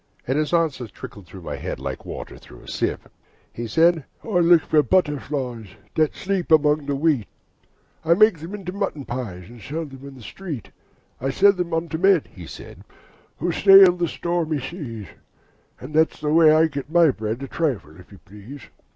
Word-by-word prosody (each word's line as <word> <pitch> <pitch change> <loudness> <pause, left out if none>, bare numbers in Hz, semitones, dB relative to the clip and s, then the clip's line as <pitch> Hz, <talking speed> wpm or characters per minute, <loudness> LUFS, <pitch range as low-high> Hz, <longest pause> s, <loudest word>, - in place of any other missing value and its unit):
And 130 - -1
his 150 0 0
answer 160 -8 0
trickled 100 -2 -11
through 95 +1 -12
my - - -5
head, - - -5
Like - - -6
water - - -8
through - - -15
a - - -17
sieve. - - -3 0.5
He 120 0 -5
said, 165 +6 +3 0.2
'I 205 -6 0
look 170 -1 +5
for 155 - +3
butterflies 145 - -1 0.3
That 155 -1 +1
sleep 195 -3 -3
among 150 -1 +3
the 140 - -1
wheat: 140 -7 +1 0.8
I 165 +1 +4
make 215 -3 +4
them 170 +6 -7
into 190 -3 -6
mutton 190 -8 -3
pies, 105 -8 -6
And 120 0 -14
sell 160 +7 -5
them 135 -1 -11
in 140 - -11
the 125 - -13
street. 150 - -7 0.5
I 135 - -2
sell 200 +8 +5
them 180 -2 -4
unto 165 0 -2
men,' 190 -4 +4
he 90 -4 -10
said, - - -11 0.5
'Who 175 - -1
sail 195 +1 +8
on 170 - +2
stormy 165 -2 -2
seas; 130 - -7 0.7
And 130 +4 -10
that's 160 +1 +2
the 150 0 -1
way 160 -1 +6
I 155 +1 +5
get 140 -3 -5
my 170 -2 +5
bread 110 +2 -4
A - - -5
trifle, 120 - -3
if 90 - -17
you 100 - -13
please.' 105 +4 -12
150 Hz, 190 wpm, -22 LUFS, 125-170 Hz, 0.8 s, sail